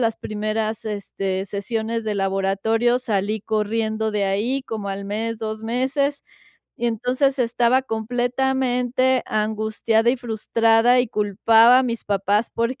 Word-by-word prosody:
las 225 -2 +1
primeras, 215 +1 -3
este, 195 -2 -3
sesiones 220 +3 -3
de 215 -1 -2
laboratorio 195 +5 +1
salí 215 -3 -1
corriendo 220 +1 -1
de 210 -1 0
ahí, 220 +8 -1
como 220 -5 -5
al 195 0 -4
mes, 220 +3 -3
2 220 -1 -5
meses. 270 +5 -1 0.5
Y 240 - -2
entonces 250 +4 0
estaba 245 +1 +2
completamente 250 +2 0
angustiada 220 +1 0
y 260 - 0
frustrada, 230 +1 +2
y 245 - 0
culpaba 225 +4 +4
a - - +3
mis 235 -3 -3
papás 205 +2 0
porque 235 +4 -1
225 Hz, 130 wpm, -22 LUFS, 210-245 Hz, 0.5 s, culpaba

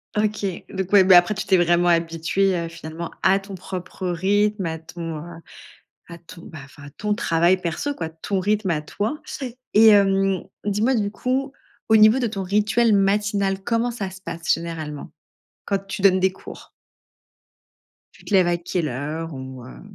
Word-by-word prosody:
OK, 210 -1 0 0.2
donc 190 -1 -4
ouais. 200 -2 +8
Bah, 185 -1 +8
après, 175 +4 +4
tu 195 - -5
t'es 190 - +4
vraiment 175 0 +3
habituée, 170 +3 +1
heu, 170 - -3
finalement, 165 0 -7
à 190 +1 +4
ton 195 0 -9
propre 185 0 -6
rythme, 200 +3 +1
à 160 0 -3
ton, 165 0 -7
heu, 165 +2 -9 0.7
à 170 -1 -10
ton 170 +1 -14
bah 160 - -10
enfin, 140 +1 -16
à - - -13
ton 210 +8 -2
travail 170 -1 +2
perso, 180 - -3
quoi. 165 -10 -5
Ton 175 +4 -3
rythme 205 +1 0
à 155 -2 -1
toi, 210 - -3 0.5
et 220 +1 +6
hem, 195 -2 +3 0.2
dis-moi, 210 +6 +1
du 205 -2 -1
coup, 260 +6 -2 0.4
au 220 - +6
niveau 215 +3 +6
de 250 - 0
ton 200 -3 -4
rituel 210 +4 +2
matinal, 200 0 +1
comment 230 +2 0
ça 205 -5 -5
se 190 +1 -12
passe 165 -3 -2
généralement? 160 -3 -5 0.5
Quand 200 - 0
tu 195 0 -6
donnes 190 -1 +5
des 190 0 +2
cours? - - -12 1.4
Tu - - -20
te - - -5
lèves 185 -2 +5
à 175 0 +1
quelle 170 -1 -2
heure, 150 +6 -5
ou 130 -2 -8
heu? 125 - -12
190 Hz, 180 wpm, -22 LUFS, 165-205 Hz, 1.4 s, ouais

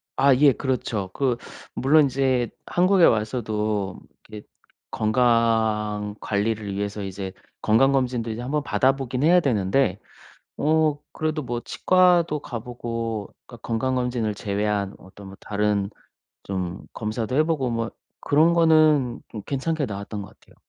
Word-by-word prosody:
아 135 0 +5
예. 140 +2 +6
그렇죠. 115 -8 -2
그 130 -4 0 0.4
물론 150 +4 +4
인제 130 -3 +1 0.2
한국에 185 0 +4
와서도 105 -3 0 0.3
그 105 -1 -8 0.5
건강 110 -2 +1
관리를 105 -1 -1
위해서 100 +1 -3
이제 95 0 -6 0.3
건강검진도 125 0 +2
이제 110 +2 -5
한번 145 +4 -2
받아 135 -1 +2
보긴 130 -1 -3
해야 175 +3 +6
되는데 125 - +1 0.6
어 155 0 +2
그래도 155 0 -2
뭐 120 -2 -3
치과도 175 -1 +3
가 120 -4 -6
보고 115 -3 -5
그러니까 120 -2 -12
건강검진을 125 -2 -1
제외한 100 0 -2
어떤 95 +1 -13
뭐 95 - -11
다른 105 -1 -1 0.5
좀 90 -2 -4
검사도 110 +3 -3
해 155 - +5
보고 150 -6 -1
뭐 115 -1 -2 0.3
그런 155 +4 +3
거는 155 -6 +4
좀 105 - -7
괜찮게 145 +2 -1
나왔던 100 0 -6
것 100 - -10
같아요. - - -23
120 Hz, 280 characters per minute, -24 LUFS, 105-140 Hz, 0.6 s, 예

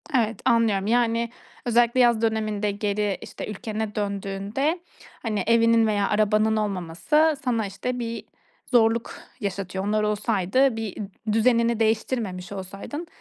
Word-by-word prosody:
Evet, 225 -2 +1
anlıyorum, 215 -4 +3
yani, 235 0 +2 0.4
özellikle 240 +1 +3
yaz 240 -3 +4
döneminde 215 -2 0
geri, 205 -1 -1
işte, - - -7
ülkene 215 +1 -4
döndüğünde, 200 - -2 0.4
hani, 215 -4 -1
evinin 230 -1 +4
veya 205 -2 +1
arabanın 215 +1 +2
olmaması 210 - +1
sana, 230 -4 +1
işte, 250 +6 -4
bir 230 -1 -4 0.4
zorluk 230 -1 +2 0.2
yaşatıyor. 190 -3 -3
Onlar 215 +1 +1
olsaydı, 210 +4 +1
bir 220 -4 -4
d 210 +1 -5
düzenini 235 0 +3
değiştirmemiş 220 -4 -1
olsaydın 200 - -6
220 Hz, 125 wpm, -25 LUFS, 205-235 Hz, 0.4 s, yaz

